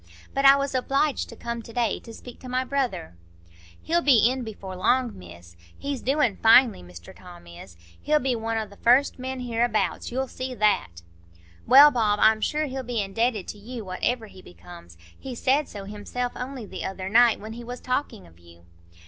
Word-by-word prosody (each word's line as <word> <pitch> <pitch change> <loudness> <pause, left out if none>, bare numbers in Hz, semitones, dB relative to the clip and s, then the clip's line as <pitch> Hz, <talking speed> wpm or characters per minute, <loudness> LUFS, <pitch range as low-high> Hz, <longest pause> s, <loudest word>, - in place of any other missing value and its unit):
But 275 0 0
I 275 0 +9
was 280 0 -2
obliged 275 +2 0
to - - -10
come 235 0 -5
to 230 - -12
day 230 -2 -1
to 230 - -12
speak 245 +2 -12
to 255 - -10
my 255 +1 0
brother." 260 - -3 0.7
"He'll 340 +1 +1
be 245 -6 +5
in 260 -1 -4
before 200 -4 -8
long, 245 +6 +1
Miss. 85 -1 -14 0.2
He's 280 -2 -4
doin' 260 -6 +1
finely, 225 - +5
Mr 90 -1 -13
Tom 175 - -14
is; 85 0 -13 0.2
he'll 305 0 +2
be 265 -3 0
one 225 0 -3
o' 220 - -2
the 200 -1 -17
first 255 +3 +3
men 260 0 -5
hereabouts,—you'll 240 +2 -1
see 255 0 -6
that." 200 - 0 0.6
"Well, 285 +3 +9
Bob, 215 -5 +1
I'm 220 0 +4
sure 305 +6 0
he'll 265 -1 -5
be 245 -2 -3
indebted 210 +1 -1
to 210 - -8
you, 230 +1 -8
whatever 220 +6 -2
he 190 -3 -14
becomes; 85 - -14 0.2
he 260 -2 -7
said 275 +4 +1
so 200 -2 -8
himself 210 +5 -5
only 255 -2 -6
the - - -7
other 190 -1 -5
night, 230 +2 +4
when 215 +2 -8
he 240 +1 -9
was 245 +1 -7
talking 255 - -3
of 85 0 -20
you." 85 0 -19
235 Hz, 190 wpm, -25 LUFS, 195-255 Hz, 0.7 s, I